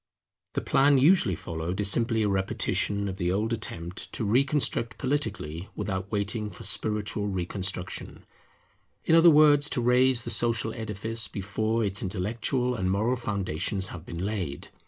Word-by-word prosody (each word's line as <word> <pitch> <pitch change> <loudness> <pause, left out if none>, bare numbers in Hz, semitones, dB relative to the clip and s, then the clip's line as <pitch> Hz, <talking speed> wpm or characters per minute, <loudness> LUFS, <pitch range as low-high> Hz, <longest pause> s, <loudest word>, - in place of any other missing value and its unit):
The - - -1
plan 140 +1 +4
usually 135 - +4
followed 85 +4 -5
is 100 -1 +4
simply 115 -1 +2
a - - +2
repetition 100 +1 -1
of 95 -1 -5
the 90 0 0
old 110 +5 0
attempt 85 -5 -4
to - - -2
reconstruct 130 0 +1
politically 105 - -3
without 100 -1 -4
waiting 105 +1 -1
for 115 - -10
spiritual 105 0 -1
reconstruction; 95 0 -4 0.8
in - - +2
other 165 +1 +8
words, 150 -1 +6
to - - 0
raise 125 0 +3
the 120 - -4
social 110 0 0
edifice 110 +1 -3
before 110 +3 -1
its 100 0 -2
intellectual 115 +6 -1
and 95 -6 -1
moral 110 +6 +1
foundations 100 -4 -2
have 80 - -8
been 85 +1 -5
laid. 95 -10 -4
105 Hz, 150 wpm, -27 LUFS, 95-120 Hz, 0.8 s, other